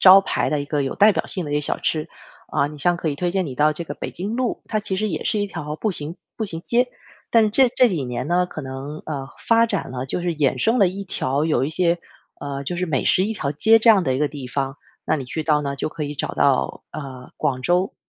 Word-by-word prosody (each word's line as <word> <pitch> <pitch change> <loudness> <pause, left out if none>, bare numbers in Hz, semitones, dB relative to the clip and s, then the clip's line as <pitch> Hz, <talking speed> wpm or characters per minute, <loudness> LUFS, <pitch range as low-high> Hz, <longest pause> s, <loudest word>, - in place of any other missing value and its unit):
招 190 +1 +9
牌 - - -1
的 150 -1 +1
一 - - -3
个 145 0 -1
有 135 - -2
代 210 +1 +7
表 - - -1
性 180 -4 +1
的 145 - -4
一 - - +1
些 150 - +2
小 - - -2
吃。 155 +1 -1 0.5
嗯， 145 +1 +2
你 - - -9
像 175 +4 +2
可 160 - -1
以 145 - -1
推 175 +4 -1
荐 190 -2 0
你 130 - -6
到 150 +3 +3
这 170 - -5
个 - - -6
北 - - -5
京 200 +5 -4
路， 255 -2 -1
它 215 - 0
其 205 -2 -2
实 215 +2 0
也 160 - -3
是 215 - +1
一 205 - 0
条 150 -5 -5
步 215 - 0
行 155 0 -5 0.2
步 220 - -2
行 165 -5 -5
街。 245 +6 +1 0.4
但 225 -2 +4
这 260 +5 +6
这 250 - +4
几 165 -10 -2
年 125 +2 -4
呢， 180 +1 +3
可 155 - -7
能， 135 +3 -6
呃， 140 -3 -4 0.2
发 230 0 +6
展 230 - -2
了， 125 0 -4
就 135 +6 -2
是 175 -2 -2
衍 140 -3 +1
生 225 - +2
了 195 - +6
一 190 +3 -3
条 145 -5 -1
有 135 -5 +2
一 145 - -2
些， 170 +1 +2 0.4
呃， 140 -1 -4
就 175 +6 -3
是 180 - 0
美 150 -6 -1
食 185 - +4
一 220 - -1
条 140 -9 -2
街 220 +10 +5
这 225 - +2
样 205 -5 +7
的 130 -3 +1
一 130 - -1
个 150 - +2
地 140 -3 -7
方。 135 +1 -2 0.3
那 155 - +2
你 135 - -5
去 155 +5 -4
到 150 -1 +2
呢， 140 -1 -2
就 - - -1
可 155 0 -5
以 145 0 -4
找 - - -3
到， 65 0 +1
呃， 130 -3 -8
广 130 -2 0
州 180 +5 +1
155 Hz, 300 characters per minute, -22 LUFS, 140-190 Hz, 0.5 s, 招